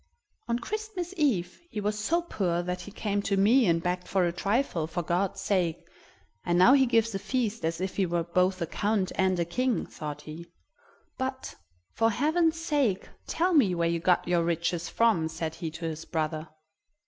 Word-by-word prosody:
"On 235 0 +1
Christmas 385 - -5
Eve 220 - 0
he 220 - -4
was 210 +1 -1
so 335 +11 +1
poor 175 - -1
that 180 0 -3
he 205 - -9
came 205 -1 -1
to 200 -1 0
me 225 +5 +5
and 165 -1 +2
begged 180 0 -2
for 190 -2 +2
a 170 - +1
trifle, 195 - 0
for 175 +2 -3
God's 180 +4 -1
sake, 180 -5 0 0.6
and 175 0 +1
now 185 +9 +7
he 265 -2 +5
gives 230 -2 +2
a 195 - -2
feast 225 +1 -2
as 165 +1 -1
if 190 0 -3
he 195 -2 +2
were 170 0 0
both 180 +2 +1
a - - 0
count 200 +2 0
and 185 -1 +1
a 170 - +1
king!" 250 +8 0
thought 150 -1 -7
he. 160 +3 -9 0.7
"But, 260 0 -3 0.4
for 225 0 +3
heaven's 320 +7 +1
sake, 285 - 0 0.2
tell 355 +3 +1
me 220 - +4
where 170 0 +1
you 170 0 0
got 175 +1 +2
your 175 -1 +2
riches 170 0 -1
from," 220 -9 +2
said 160 0 -4
he 165 0 -5
to 160 +2 -7
his 160 0 -4
brother. 155 -1 -2
190 Hz, 195 wpm, -28 LUFS, 170-235 Hz, 0.7 s, now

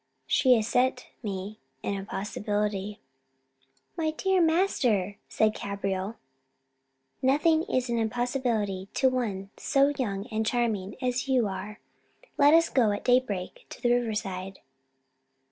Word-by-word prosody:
She 255 -2 +4
has 220 -2 0
set 250 +1 +1 0.2
me 200 -1 -5 0.2
an - - -1
impossibility." 205 +1 -3 1.0
"My 320 -2 0
dear 375 +4 +1
master," 255 - +2
said 215 0 +2
Cabriole, 195 +1 -3 1.1
"nothing 305 +5 +3
is 255 0 +1
an 235 -1 0
impossibility 225 -4 -1
to 260 +1 +4
one 205 -6 -3
so 280 +1 +2
young 200 -5 -2
and 220 0 0
charming 215 -4 -1
as 250 +1 -1
you 255 -5 +3
are: 205 +2 -6 0.6
let 290 +2 +6
us 330 0 +5
go 240 -5 +3
at 205 - -4
daybreak 245 -8 0
to - - -10
the 240 0 +2
river 240 -3 0
side." 190 -2 -4
225 Hz, 130 wpm, -28 LUFS, 200-255 Hz, 1.1 s, let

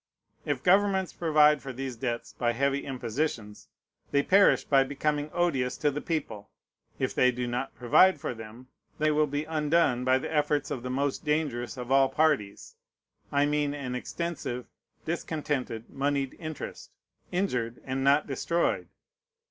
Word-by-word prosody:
If 145 -3 -1
governments 190 0 +3
provide 150 -3 +4
for 135 - -6
these 130 0 -5
debts 120 0 -4
by 120 -1 0
heavy 140 +3 0
impositions, 120 -4 -3 0.4
they 140 0 +2
perish 200 +5 +5
by 135 -1 +4
becoming 145 +2 -1
odious 135 -8 0
to 150 -1 +1
the 150 +2 -4
people. 115 -11 -4 0.5
If - - -1
they 125 - +4
do 125 0 -3
not 125 +2 -3
provide 150 +8 +4
for 150 - -3
them, 115 +2 -11 0.3
they 155 0 +2
will 150 0 +2
be 145 +1 -2
undone 155 -4 +1
by 130 +1 +4
the 130 - -5
efforts 150 -1 +1
of 130 - -3
the 125 - -5
most 135 +2 -1
dangerous 145 -5 -1
of 125 0 -6
all 135 0 +5
parties: 135 -9 0 0.6
I 140 0 +3
mean 145 -1 0
an 135 -3 -5
extensive, 125 -2 -4 0.4
discontented 145 -8 -3
moneyed 140 -1 -1
interest, 155 -3 -7 0.4
injured 125 -11 -1
and 130 0 -2
not 140 +2 +4
destroyed. 170 +5 -1
140 Hz, 150 wpm, -28 LUFS, 125-155 Hz, 0.6 s, perish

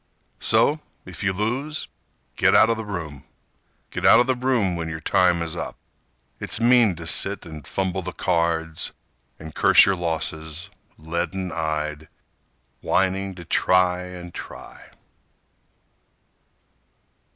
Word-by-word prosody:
So, 150 +2 +3 0.3
if 90 -4 -9
you 100 - +1
lose, 125 +10 -2 0.5
get - - +3
out 115 - +6
of 115 - -1
the 110 -1 -6
room— 80 -8 -6 0.7
Get - - -5
out - - +7
of 120 - +4
the 130 - +2
room 125 -7 +1
when 80 -1 -4
your 80 0 -5
time 85 +1 +2
is 80 0 -4
up. - - -5 0.6
It's - - -2
mean 120 -4 +5
to 85 0 -9
sit 95 +4 -1
and 80 -3 -10
fumble 95 -1 -2
the 95 +1 -5
cards 80 -2 -1 0.4
And 80 -1 -10
curse - - +6
your 95 - +2
losses, 80 +1 -3 0.3
leaden 85 +3 -3
eyed, 75 -1 -3 0.7
Whining 95 0 0
to 85 -1 -10
try 90 +1 +2
and 90 -1 -9
try. - - -10
90 Hz, 130 wpm, -23 LUFS, 80-100 Hz, 0.7 s, out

